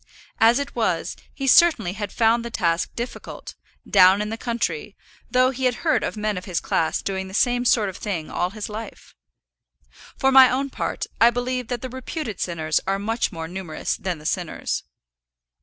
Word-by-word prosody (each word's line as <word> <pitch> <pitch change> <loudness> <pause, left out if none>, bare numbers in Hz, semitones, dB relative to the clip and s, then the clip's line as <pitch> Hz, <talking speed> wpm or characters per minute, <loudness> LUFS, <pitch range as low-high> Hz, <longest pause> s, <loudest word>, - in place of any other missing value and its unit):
As 230 +2 +6
it 280 0 -4
was, - - -1 0.2
he 275 - -5
certainly 260 - +5
had 205 -1 -5
found 230 0 +2
the 235 - -5
task 170 -6 0
difficult, 240 +1 -7 0.3
down 185 +2 +6
in 210 0 -2
the 225 - -3
country, 215 -6 -3 0.3
though 255 0 +3
he 260 0 -3
had 250 -1 +2
heard 315 - +3
of - - -3
men 210 -2 -1
of 180 - -13
his 180 -3 -1
class 160 - 0
doing 190 -1 -3
the 190 - -8
same 245 +1 +2
sort 225 -3 +3
of 190 - -6
thing 175 -7 -4
all 175 - -1
his 210 +1 -6
life. 220 +1 -8 1.0
For 270 -1 +3
my 265 -1 +9
own 270 +2 -1
part, - - -3 0.2
I 230 - +8
believe 245 0 -2
that 245 0 -4
the 255 - -4
reputed 260 - -5
sinners 160 -3 0
are 195 0 +1
much 225 +4 -1
more 160 -1 -6
numerous 180 -2 -4
than 180 -2 -3
the 150 - -14
sinners. 175 0 -2
220 Hz, 190 wpm, -23 LUFS, 185-245 Hz, 1.0 s, my